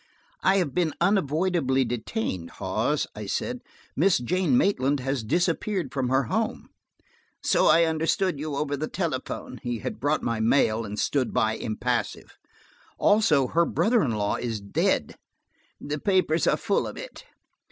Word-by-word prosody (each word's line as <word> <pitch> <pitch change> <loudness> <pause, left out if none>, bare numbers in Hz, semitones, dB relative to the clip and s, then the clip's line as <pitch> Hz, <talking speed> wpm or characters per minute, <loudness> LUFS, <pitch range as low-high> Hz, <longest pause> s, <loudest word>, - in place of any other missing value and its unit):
"I've 190 -7 +2
been 170 -4 0
unavoidably 165 -6 +1
detained, 115 - -3
Hawes," - - 0
I - - -7
said, - - -2 0.4
"Miss 180 +5 +4
Jane 185 - +1
Maitland 145 - +2
has 135 -1 -2
disappeared 175 - -1
from 130 -3 -1
her 135 +1 +3
home." 220 - -2 0.7
"So - - +3
I 170 - +6
understood 160 +1 0
you 150 -1 -3
over 145 0 -1
the 155 +2 -3
telephone." 145 -6 -4
He 120 -1 -3
had 105 - -5
brought 145 +5 0
my 115 -1 -1
mail 115 -1 +2
and 105 0 -6
stood 130 +3 0
by 110 -3 +2
impassive. 110 -2 -3 0.6
"Also, 185 -10 +4
her 170 - +3
brother 225 +7 +2
in 120 - 0
law 105 -1 0
is 115 -3 -3
dead." 100 0 -1 0.6
"The 145 +1 -4
papers 185 -4 +2
are - - +3
full - - 0
of - - -8
it." - - -9
145 Hz, 150 wpm, -26 LUFS, 120-180 Hz, 0.7 s, I